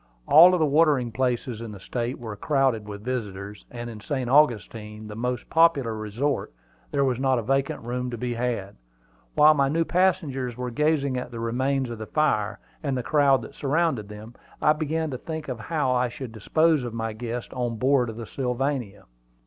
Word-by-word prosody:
All 165 +4 +9
the 180 -4 +3
watering 145 -5 +3
places 125 -2 -1
in 115 -2 -6
the 100 - -10
State 120 +5 -3
were 110 -3 -7
crowded 135 -7 +1
with 100 0 -8
visitors, 105 -5 -5
and 120 -1 -6
in 115 -2 -8
St. 130 +2 -3
Augustine, 110 -6 +1
the 105 - -8
most 125 +1 -3
popular 160 -8 +3
resort, 110 +7 -2 0.4
there 140 -1 +1
was 130 -2 0
not 130 -1 +2
a 115 - -1
vacant 135 +2 0
room 125 +1 -3
to 120 - -5
be 120 +1 -2
had. 115 -5 -3 0.6
While 155 +1 +7
my 140 -2 +2
new 165 +3 +1
passengers 150 -10 0
were 125 0 -4
gazing 145 -1 +1
at 125 - -4
the 120 -2 -7
remains 130 +3 0
of 115 - -6
the 110 - -6
fire 110 -9 +1 0.2
and 140 -4 -1
the 125 - -2
crowd 140 -2 +3
that - - -10
surrounded 145 -7 0
them, 105 +3 -10 0.3
I 150 - +4
began 155 0 -2
to 130 - -5
think 160 -2 -5
how 130 +3 -2
I 125 0 +2
should 125 0 -7
dispose 155 +7 +2
of 120 -2 -5
my 115 -1 -3
guests 120 +1 -5
on 120 -2 -2
board 125 +1 +2
of 110 - -7
the 115 - -6
Sylvania. 125 -4 -2
125 Hz, 190 wpm, -25 LUFS, 115-140 Hz, 0.6 s, All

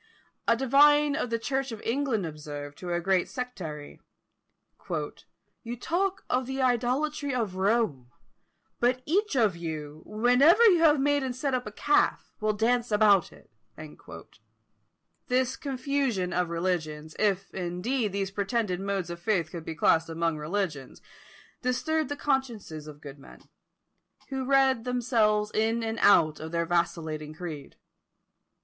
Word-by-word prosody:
A 230 - +4
divine 290 +3 +5
of 270 -5 -2
the 230 - 0
Church 265 +2 -2
of 225 - -6
England 240 -5 0
observed 145 -2 -7
to 180 -1 -5
a 175 - +1
great 185 0 +1
sectary, 175 - -6 0.9
"You 180 +8 -7
talk 375 +7 -1
of 250 0 0
the 265 0 -4
idolatry 260 +3 0
of 220 -6 -1
Rome: 190 - 0 0.7
but 250 +1 +1
each 405 +3 +1
of 220 -8 +3
you, 155 -3 -6
whenever 250 - +5
you 370 -6 +6
have 310 -3 +5
made 290 +1 +2
and 260 -2 -3
set 270 +1 -2
up 250 -3 -1
a - - -6
calf, 290 +7 +1
will 215 0 +2
dance 235 +2 +1
about 205 -3 +4
it." - - -19 1.8
This 255 0 +1
confusion 265 -8 -1
of 180 -1 0
religions, 160 -3 -3
if, 195 -2 0
indeed, 195 +6 -2
these 195 0 -2
pretended 200 -2 -1
modes 195 -3 -2
of 170 - -7
faith 175 -4 0
could 170 -2 -7
be 160 - -6
classed 165 0 +3
among 165 -1 -1
religions, 155 -5 -3 0.6
disturbed 295 +4 0
the 290 - -2
consciences 230 - -2
of 150 -1 -11
good 140 -1 -10
men, - - -15 0.9
who 265 -1 -3
read 265 -3 +3
themselves 225 -4 +1
in 225 +2 0
and 225 0 -3
out 155 -6 +5
of 160 +1 -7
their 170 0 0
vacillating 160 -3 -2
creed. 160 -4 -7
215 Hz, 140 wpm, -28 LUFS, 170-260 Hz, 1.8 s, you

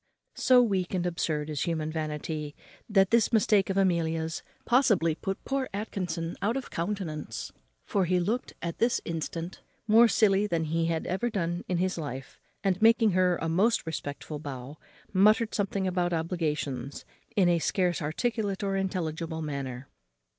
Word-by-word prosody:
So 250 -1 +6
weak 190 -5 0
and 180 -1 0
absurd 160 -4 -1
is 145 -3 -2
human 160 -3 -1
vanity, 155 -1 -4 0.3
that 195 -2 +4
this 230 -1 +4
mistake 210 -3 +3
of 195 - -1
Amelia's 165 -4 +1 0.2
possibly 215 - +3
put 195 +5 -5
poor 270 -1 -1
Atkinson 180 -5 -3
out 225 +6 +1
of 270 - -6
countenance, 165 - -4 0.3
for 195 -2 +1
he 180 +1 +2
looked 220 +8 -1
at 170 -1 -4
this 235 +1 +2
instant 165 +1 -4 0.2
more 230 +2 +7
silly 210 -2 +3
than 170 -4 0
he 165 +1 0
had 165 -1 -1
ever 195 +7 -1
done 175 -5 -2
in 180 - 0
his 185 0 0
life; 135 -3 -6 0.2
and, 190 -1 +1
making 225 -1 +5
her 180 -1 +3
a 165 - -2
most 195 +8 +2
respectful 145 -2 -5
bow, 140 0 -7 0.3
muttered 215 +4 +4
something 195 -1 -1
about 180 -1 0
obligations, 150 -6 -2 0.3
in 190 -3 +4
a 170 -1 +3
scarce 180 0 0
articulate 205 +5 -1
or 195 -1 0
intelligible 165 -4 -2
manner. 135 -3 -5
175 Hz, 155 wpm, -28 LUFS, 160-200 Hz, 0.3 s, more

